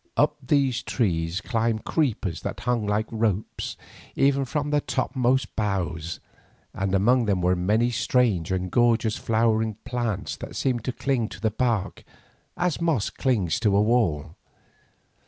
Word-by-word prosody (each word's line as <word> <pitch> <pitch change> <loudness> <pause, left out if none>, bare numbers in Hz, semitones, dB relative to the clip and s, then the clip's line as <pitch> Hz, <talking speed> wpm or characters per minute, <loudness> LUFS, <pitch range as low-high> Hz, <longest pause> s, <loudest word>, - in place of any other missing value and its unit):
Up 150 0 +3
these 135 -1 +1
trees 85 -5 -1
climbed 115 -2 -1
creepers 115 - -1
that - - -5
hung 120 -4 0
like 105 +1 +1
ropes 110 -3 -2 0.4
even 140 0 +3
from 145 +3 -2
the 145 0 +2
topmost 130 -3 0
boughs, 90 -6 -2 0.5
and 95 0 -1
among 120 +5 +3
them 100 -3 +1
were 90 +1 +2
many 105 +7 +1
strange 110 -8 +1
and 90 -1 -1
gorgeous 120 -2 +3
flowering 110 -1 +1
plants 115 -5 -2
that - - -8
seemed 125 -4 0
to 130 - 0
cling 125 -3 -1
to - - -10
the 110 +1 0
bark 110 -4 -1 0.5
as 175 -2 0
moss 155 -11 +1
clings 115 - 0
to 105 -3 +2
a - - +5
wall. 105 -11 +1
110 Hz, 145 wpm, -25 LUFS, 100-125 Hz, 0.5 s, a